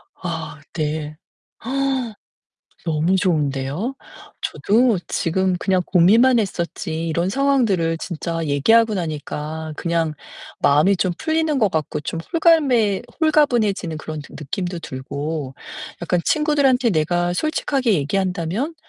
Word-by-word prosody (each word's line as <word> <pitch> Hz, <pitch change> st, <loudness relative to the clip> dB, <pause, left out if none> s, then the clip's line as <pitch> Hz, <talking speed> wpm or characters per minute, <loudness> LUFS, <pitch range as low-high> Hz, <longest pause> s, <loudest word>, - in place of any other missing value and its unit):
아, 160 Hz, -3 st, -5 dB
네. 155 Hz, -1 st, -3 dB, 1.7 s
너무 165 Hz, +3 st, +1 dB
좋은데요? 155 Hz, -, -1 dB, 0.5 s
저도 225 Hz, -1 st, +2 dB
지금 185 Hz, +2 st, 0 dB
그냥 185 Hz, 0 st, +1 dB
고민만 225 Hz, +8 st, +5 dB
했었지 170 Hz, -4 st, -3 dB
이런 170 Hz, +3 st, 0 dB
상황들을 215 Hz, -11 st, +2 dB
진짜 165 Hz, -1 st, -4 dB
얘기하고 215 Hz, +11 st, +3 dB
나니까 155 Hz, -1 st, -4 dB
그냥 165 Hz, -2 st, 0 dB, 0.5 s
마음이 150 Hz, +8 st, +4 dB
좀 175 Hz, 0 st, 0 dB
풀리는 315 Hz, -2 st, 0 dB
것 210 Hz, -4 st, +3 dB
같고 155 Hz, -2 st, -2 dB
좀 165 Hz, -, -4 dB
홀가매 275 Hz, -, +3 dB, 0.2 s
홀가분해지는 235 Hz, -, +2 dB
그런 155 Hz, -1 st, -6 dB
느 145 Hz, -, -13 dB
느낌도 175 Hz, +4 st, -4 dB
들고, 140 Hz, +1 st, -5 dB, 0.5 s
약간 175 Hz, 0 st, +1 dB
친구들한테 280 Hz, -5 st, +3 dB
내가 175 Hz, +1 st, +1 dB
솔직하게 270 Hz, -3 st, 0 dB
얘기한다면 185 Hz, -, -1 dB
175 Hz, 265 characters per minute, -21 LUFS, 155-230 Hz, 1.7 s, 고민만